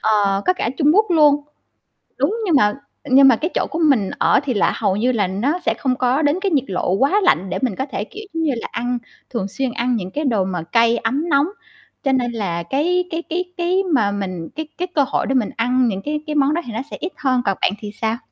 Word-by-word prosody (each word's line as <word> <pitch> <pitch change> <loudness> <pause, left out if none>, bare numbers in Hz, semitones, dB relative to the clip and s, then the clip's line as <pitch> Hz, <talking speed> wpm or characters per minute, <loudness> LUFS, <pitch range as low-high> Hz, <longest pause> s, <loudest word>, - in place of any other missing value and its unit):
ờ, 200 -2 +2
có - - +5
cả 300 -10 -2
Trung 295 -1 +3
Quốc 425 +2 +4
luôn. 300 -4 +5 0.8
Đúng, 440 - +1
nhưng 340 - +2
mà 210 -6 +4 0.4
nhưng 270 +1 +7
mà 255 - +6
cái 325 +9 -2
chỗ - - 0
của 330 - -3
mình 270 - +3
ở - - +4
thì 260 -3 -1
là 205 - +2
hầu 190 - 0
như 240 +5 +1
là 210 -6 +1
nó 245 - -1
sẽ - - +2
không 255 -2 0
có 255 +4 +1
đến 295 +4 +2
cái 395 -2 0
nhiệt 280 -5 +2
lộ 180 -1 -1
quá 275 - +2
lạnh 185 - +2
để - - -2
mình 250 -7 0
có 265 - -2
thể, 205 - -2
kiểu, 420 - -10
giống 325 0 -1
như 300 - +2
là, - - -5
ăn 245 +1 -2 0.3
thường 215 -6 -3
xuyên 260 +5 -3
ăn 240 +1 0
những 185 -4 -4
cái 300 +7 -3
đồ 220 -7 +2
mà 180 -3 -3
cay 230 +5 +3
ấm 280 +9 -1
nóng. 285 +2 +3 0.6
Cho 270 - +1
nên 245 -2 +1
là 175 -7 -3
cái 340 - +1
cái 330 0 -2
cái 360 +3 -1
cái 360 +2 +1
mà 215 -7 +3
mình 185 -5 -4
cái 315 0 -4
cái 360 - -2
cơ 285 - +4
hội - - -1
để 270 - 0
mình 235 -5 +1
ăn 250 +2 +2
những 195 -3 -2
cái 300 0 -2
cái 300 - -3
món 285 +1 +3
đó 340 - 0
thì 235 - -6
nó 225 - -3
sẽ - - -6
ít 355 - -4
hơn, 255 -3 +1
còn 195 - 0
bạn - - +3
thì 205 -1 -6
sao? 225 +1 0
255 Hz, 260 wpm, -20 LUFS, 210-300 Hz, 0.8 s, nhưng